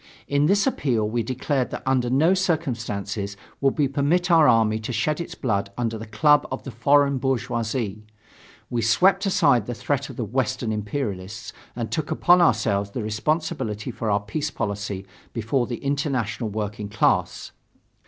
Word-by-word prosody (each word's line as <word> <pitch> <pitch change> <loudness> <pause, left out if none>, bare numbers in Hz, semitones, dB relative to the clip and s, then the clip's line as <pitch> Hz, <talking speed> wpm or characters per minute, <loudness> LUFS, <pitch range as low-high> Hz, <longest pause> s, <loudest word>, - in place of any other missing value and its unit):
In 145 +1 +2
this 200 +3 +3
appeal 125 - 0
we 115 +2 -1
declared 130 +3 -1
that - - -6
under 130 -2 +1
no 155 +8 +4
circumstances 115 - -2 0.2
would 135 -1 +2
we 145 -2 +3
permit 150 +7 +1
our 160 -2 +6
army 110 -2 +3
to 110 +3 -5
shed 145 +8 0
its 170 - -7
blood 100 -6 -1
under 115 -2 -1
the 110 0 -7
club 145 +8 +3
of - - -4
the 135 - -7
foreign 140 +3 +3
bourgeoisie. 120 -4 -2 0.7
We 120 -1 0
swept 190 - +3
aside 140 - +3
the 120 - -3
threat 140 +3 -2
of 130 - -8
the 120 - -3
Western 120 0 -1
imperialists 105 -1 -4 0.2
and 115 -2 -4
took 155 -2 -2
upon 180 +1 +4
ourselves 105 -9 +2
the 110 +3 -4
responsibility 110 -1 -2
for 115 -1 -3
our 100 0 +2
peace 145 +9 -3
policy 100 -5 -4 0.3
before 120 +2 0
the 120 - -3
international 140 -5 -2
working 105 0 -4
class. 105 0 0
120 Hz, 165 wpm, -24 LUFS, 110-145 Hz, 0.7 s, our